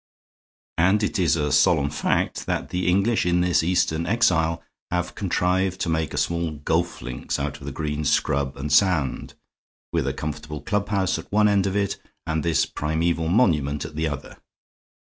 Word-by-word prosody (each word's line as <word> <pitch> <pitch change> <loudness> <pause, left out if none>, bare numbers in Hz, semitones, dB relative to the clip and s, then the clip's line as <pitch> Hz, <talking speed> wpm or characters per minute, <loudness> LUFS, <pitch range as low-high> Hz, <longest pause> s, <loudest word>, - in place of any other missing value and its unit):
And 95 +5 +3
it 105 - -1
is 85 -3 +3
a 75 -2 -1
solemn 75 0 +3
fact 75 - -1
that - - -2
the 90 0 -2
English 100 +6 +2
in 90 0 +2
this 90 -1 +3
Eastern 85 -1 +1
exile 85 -8 +2 0.3
have 90 0 -2
contrived 95 -1 0
to 85 - 0
make 80 -2 -1
a - - -4
small 85 -2 0
golf 80 +3 -1
links 65 -1 -4
out 70 +1 -3
of 70 - -11
the - - -3
green 75 +1 -3
scrub 70 -1 0
and 70 +1 -3
sand; 90 -9 +2 0.6
with - - 0
a - - 0
comfortable 75 0 -5
clubhouse 100 +1 0
at - - -12
one 105 +1 +4
end 100 -2 +2
of 95 - -2
it 100 -1 0 0.3
and 80 0 -1
this 80 -4 +2
primeval 80 +2 -1
monument 80 - +2
at 80 -1 -9
the 80 +1 0
other. 70 -3 -6
80 Hz, 175 wpm, -24 LUFS, 75-95 Hz, 0.6 s, one